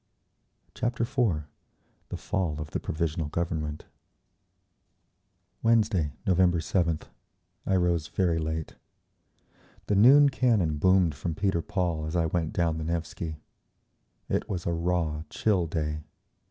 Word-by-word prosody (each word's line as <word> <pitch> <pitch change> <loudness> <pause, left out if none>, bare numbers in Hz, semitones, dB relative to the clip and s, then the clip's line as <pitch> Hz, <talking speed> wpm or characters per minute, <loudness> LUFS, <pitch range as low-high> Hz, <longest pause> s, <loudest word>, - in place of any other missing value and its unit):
Chapter 120 0 -1
IV 115 - 0 0.7
The - - -4
Fall 90 -7 -2
of 75 0 -6
the - - -2
Provisional 80 -1 -2
Government 80 -2 -3 1.8
Wednesday, 105 -10 +2
November 90 -1 +3
7th, 85 -1 0 0.6
I 95 - +3
rose 85 -3 +1
very 85 -4 +1
late. 80 0 -4 1.1
The 105 - +1
noon 140 +8 +7
cannon 110 - +1
boomed 95 -2 +4
from 80 +3 -4
Peter 95 -2 0
Paul 85 -3 -2
as 80 - -4
I 85 -2 +2
went 80 -1 -1
down 80 -2 0
the - - -3
Nevsky. 80 -1 -4 0.9
It - - -1
was 90 -4 -3
a 85 - 0
raw, 85 -2 -1
chill 95 -6 +1
day. 75 -1 -2
85 Hz, 125 wpm, -28 LUFS, 80-95 Hz, 1.8 s, noon